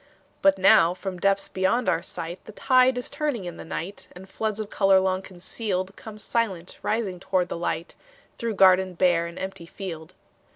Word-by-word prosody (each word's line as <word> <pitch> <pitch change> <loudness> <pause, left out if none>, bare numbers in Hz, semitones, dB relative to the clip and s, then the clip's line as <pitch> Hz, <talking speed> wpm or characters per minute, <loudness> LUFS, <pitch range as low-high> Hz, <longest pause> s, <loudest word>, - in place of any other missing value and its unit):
But 195 0 +5
now 190 -3 +5
from 185 -1 -6
depths 195 +1 +2
beyond 190 +6 0
our 165 - +2
sight, 175 0 -6
The - - -9
tide 255 +2 +4
is 250 - -3
turning 285 -10 -2
in 175 -1 -6
the - - -8
night, 180 +4 -6
And 185 +1 -12
floods 215 +1 -3
of 215 -1 -5
color 195 -1 +4
long 190 0 0
concealed 190 +1 -4
Come 220 -1 -10
silent 205 -6 -2
rising 210 -5 -1
toward 185 -1 0
the - - -3
light, 170 -1 -3 0.4
Through 230 -3 -2
garden 185 -1 +5
bare 170 -1 +3
and 170 - -10
empty 190 -3 -6
field. 170 -3 -8
190 Hz, 180 wpm, -25 LUFS, 180-210 Hz, 0.4 s, But